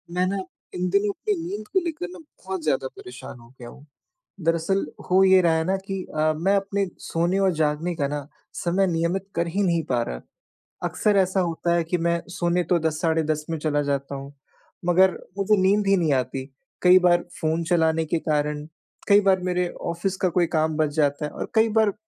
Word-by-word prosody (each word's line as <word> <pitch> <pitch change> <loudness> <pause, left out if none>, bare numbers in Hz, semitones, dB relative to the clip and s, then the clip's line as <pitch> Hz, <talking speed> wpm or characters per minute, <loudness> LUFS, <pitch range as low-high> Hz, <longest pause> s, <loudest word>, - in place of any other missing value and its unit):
मैं 180 0 +2
ना 195 - -1 0.4
इन 180 0 -1
दिनों 200 +2 +2
अपनी 210 - -2
नींद 210 +3 -6
को 380 - +2
लेकर 335 +2 -3
ना 365 - -11
बहुत 190 - -8
ज़्यादा 135 -3 0
परेशान 125 0 -10
हो 115 - -16
गया 120 -1 -9
हूँ। 145 - -15 0.6
दरअसल 165 +4 +1 0.3
हो 185 +1 +5
ये 190 0 +6
रहा 170 -2 +3
है 160 - 0
ना 190 +2 +1
कि 195 -2 -3
अ, 155 0 +2
मैं 190 +6 +2
अपने 195 0 -1
सोने 175 +4 -1
और 195 -1 +3
जागने 155 +3 0
का 140 -3 0
ना 145 -1 -4 0.3
समय 185 +3 +1
नियमित 175 +2 -1
कर 170 +1 0
ही 185 +5 -1
नहीं 170 -3 +1
पा 120 -2 +2
रहा। - - -5 0.7
अक्सर 210 -1 +1
ऐसा 190 0 +2
होता 170 0 -1
है 170 - +2
कि 165 +2 -1
मैं 170 0 0
सोने 175 0 0
तो 175 0 +1
10 155 -1 -1
साढ़े 160 -1 +2
10 155 0 -2
में 165 - -1
चला 150 -1 0
जाता 140 0 -2
हूँ 140 +1 -8 0.5
मगर 185 +2 +5 0.3
मुझे 205 +2 +3
नींद 200 +2 +3
ही 195 0 +4
नहीं 160 -5 +2
आती। 130 0 -2 0.4
कई 180 +1 +7
बार 175 -1 +3 0.2
फ़ोन 160 +1 0
चलाने 160 -2 +2
के 165 +2 -1
कारण, 150 -1 -1 0.4
कई 200 0 +7
बार 195 -1 +3
मेरे 180 0 0 0.2
ऑफ़िस 180 +3 -2
का 185 - +1
कोई 180 -1 +4
काम 155 0 +1
बच 155 -1 +2
जाता 145 -1 +1
है 150 - -5
और - - -6
कई 220 0 +4
बार 215 -2 +3
170 Hz, 210 wpm, -24 LUFS, 155-190 Hz, 0.7 s, कई